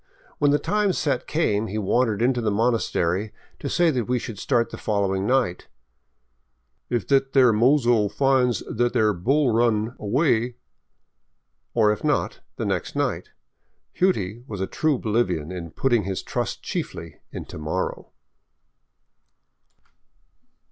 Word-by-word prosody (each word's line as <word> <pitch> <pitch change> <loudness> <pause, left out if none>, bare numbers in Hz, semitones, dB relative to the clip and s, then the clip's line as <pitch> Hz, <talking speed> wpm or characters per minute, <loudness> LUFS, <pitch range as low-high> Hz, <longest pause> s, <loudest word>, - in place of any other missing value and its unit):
When 145 - +4
the 145 - +4
time 205 +3 +1
set 140 -6 -1
came, 110 -9 0
he 105 - -4
wandered 110 +1 +1
into 125 0 +2
the 110 - 0
monastery 105 -3 0 0.3
to 140 - -4
say 170 +1 +3
that 125 -5 -1
we 125 +2 0
should 110 -3 -6
start 120 -4 +1
the - - -7
following 100 -2 0
night 125 -9 0 0.4
— 65 +1 -48
" 65 +1 -49
if 120 -4 0
thet 135 -1 +2
there 125 -4 +6
mozo 120 -2 +3
finds 130 -2 +2
thet 120 +1 0
there 110 -4 +3
bull 130 - +1
that 115 - +2
run 115 0 +1
away; 120 +1 +1 0.6
" - - -51
or 110 -3 +4
if 105 - -4
not, - - 0 0.2
then - - -3
the - - +2
next - - -5
night. - - -1 0.3
" - - -48
Hughtie 120 - 0
" - - -27
was 105 -3 -6
a 95 - 0
true 155 +6 0
Boli 115 +1 +1
vian 85 -3 -4
in 85 -2 -6
putting 120 +6 +1
his 95 -1 -3
trust - - -3
chiefly 80 -2 -5
in - - -6
to - - -9
morrow. 80 +5 -3
115 Hz, 160 wpm, -24 LUFS, 100-130 Hz, 0.6 s, there